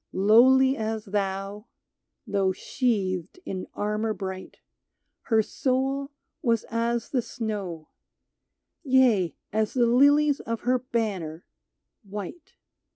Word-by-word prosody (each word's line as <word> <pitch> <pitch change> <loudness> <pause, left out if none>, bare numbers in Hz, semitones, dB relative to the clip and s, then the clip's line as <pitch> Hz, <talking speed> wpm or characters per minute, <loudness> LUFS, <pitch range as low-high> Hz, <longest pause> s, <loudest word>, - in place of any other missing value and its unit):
Lowly 260 +7 +5
as 220 -1 -3
thou 195 +1 -3 0.6
(though 195 -2 +1
sheathed 190 - -1
in 185 -1 -5
armor 210 +1 -1
bright), 190 -1 -6 0.7
Her 220 -2 +4
soul 270 +4 -1 0.3
was 230 -5 +1
as 235 0 -1
the 255 - +1
snow 200 -9 -5 0.5
— - - -57
Yea, 250 - +3 0.2
as 215 +2 0
the 245 -2 +4
lilies 285 +4 +4
of 230 -1 -4
her 250 +1 +2
banner, 200 -10 -3 0.6
white. 205 - -8
220 Hz, 105 wpm, -26 LUFS, 195-255 Hz, 0.7 s, Lowly